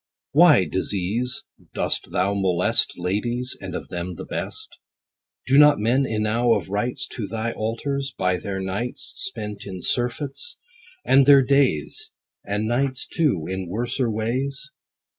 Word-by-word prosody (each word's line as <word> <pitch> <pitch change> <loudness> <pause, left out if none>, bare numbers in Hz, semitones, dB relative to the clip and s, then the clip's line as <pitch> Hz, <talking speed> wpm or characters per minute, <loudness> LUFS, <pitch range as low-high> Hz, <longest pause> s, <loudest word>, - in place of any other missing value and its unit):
Why, 155 - +6
DISEASE, 100 - -2 0.3
dost - - -1
thou 95 +2 +1
molest 95 -3 +3
Ladies, 120 +8 -2
and 95 -2 -6
of - - -6
them 90 0 -5
the - - -8
best? - - -6 0.7
Do 135 +2 +5
not 150 -1 +7
men 125 +6 +1
enow 115 +2 +1
of - - -4
rights 120 +6 -2
To 110 -5 -5
thy 115 +2 -3
altars, 135 +6 -3
by 90 0 +1
their 95 +1 -4
nights 100 +7 -3
Spent 105 - -2
in 95 -2 -6
surfeits; 135 - 0 0.5
and 135 0 +5
their 140 -2 +8
days, 130 - +1 0.3
And 105 +2 -2
nights 130 +2 0
too, 135 - 0
in 95 0 -4
worser 120 +4 -1
ways 130 +6 -2
115 Hz, 140 wpm, -23 LUFS, 95-130 Hz, 0.7 s, their